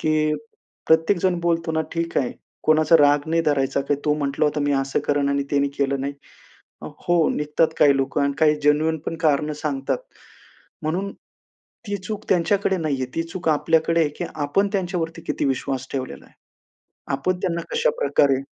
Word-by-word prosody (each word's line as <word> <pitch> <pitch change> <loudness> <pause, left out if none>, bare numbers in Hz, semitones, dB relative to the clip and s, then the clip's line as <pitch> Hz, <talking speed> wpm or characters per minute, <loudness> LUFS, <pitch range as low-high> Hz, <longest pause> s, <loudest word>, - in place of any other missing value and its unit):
की 155 -1 +1 0.5
प्रत्येक 165 +4 +4
जण 180 -1 +1
बोलतो 165 -1 0
ना, 160 - +1
"ठीक 165 0 -3
आहे, 130 - -1 0.3
कोणाचा 155 +1 +5
राग 145 0 +5
नाही 165 +1 +2
धरायचा 140 -2 +1
काय" 145 - +2
तो 150 - +3
म्हंटला 145 0 -1
होता, 150 0 0
मी 145 0 +1
असं 135 0 0
करेन 145 -1 +1
आणि 140 0 +1
ते 140 -1 +2
केलं 140 -1 0
नाही. 140 +1 -2 0.7
अ, - - -6 0.2
हो 175 -2 +3
निघतात 150 +2 +1
काही 140 -1 +5
लोकं 135 +1 0
आणि 140 0 +1
काही 150 -1 +4
जेन्युइनपण 155 +2 +1
कारणं 150 +1 +2
सांगतात. 140 - -1 0.8
म्हणून 185 +6 -2 0.8
ती 205 - -1
चूक 205 +3 -6
त्यांच्याकडे 190 +2 +2
नाही 155 -4 -1
आहे, 130 - 0
ती 165 - 0
चूक 165 0 -3
आपल्याकडे 165 +2 +2
आहे, 155 - +2
की 175 - -3
आपण 155 +7 +1
त्यांच्यावरती 175 -3 -2
किती 150 - -1
विश्वास 135 -1 -2
ठेवलेला 130 -2 -5
आहे. - - -24 0.8
आपण 180 +7 -1
त्यांना 170 -2 -1
कशाप्रकारे 465 - +2
155 Hz, 170 wpm, -23 LUFS, 140-170 Hz, 0.8 s, कोणाचा